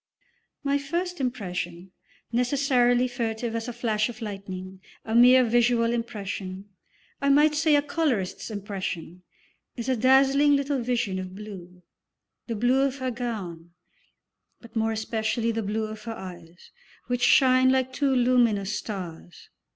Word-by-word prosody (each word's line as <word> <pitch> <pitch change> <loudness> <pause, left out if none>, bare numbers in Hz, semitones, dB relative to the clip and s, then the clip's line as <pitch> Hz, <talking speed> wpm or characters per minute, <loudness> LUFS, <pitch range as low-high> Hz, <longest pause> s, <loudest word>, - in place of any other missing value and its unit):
My 280 0 +1
first 345 +3 -3
impression, 185 -7 -4 0.4
necessarily 250 0 +2
furtive 230 -1 -3
as 230 +1 -3
a - - -3
flash 220 -2 0
of 240 -1 -9
lightning, 190 -3 -7 0.2
a 220 - -4
mere 250 +2 +7
visual 235 0 +2
impression, 200 -4 -5 0.5
I 280 - +2
might 295 +2 +5
say 305 0 +3
a 290 - +3
colourist's 285 - -1
impression, 190 -4 -5 0.6
is 235 0 -4
a 260 - +2
dazzling 270 +4 +4
little 280 -1 0
vision 230 -6 -1
of 185 0 -7
blue 180 -4 -10 0.6
the 230 - -3
blue 245 +5 +2
of 275 -1 +1
her 260 -1 -2
gown, 190 -9 -5 0.9
but 235 - -16
more 225 0 +1
especially 220 +1 -1
the 225 0 -2
blue 215 +2 -2
of 215 +1 -8
her 230 - -4
eyes, 175 -3 -11 0.3
which 245 -1 -2
shine 260 0 +5
like 260 -1 0
two 280 +1 +1
luminous 240 -6 +2
stars. 180 -5 -7
230 Hz, 140 wpm, -26 LUFS, 200-255 Hz, 0.9 s, mere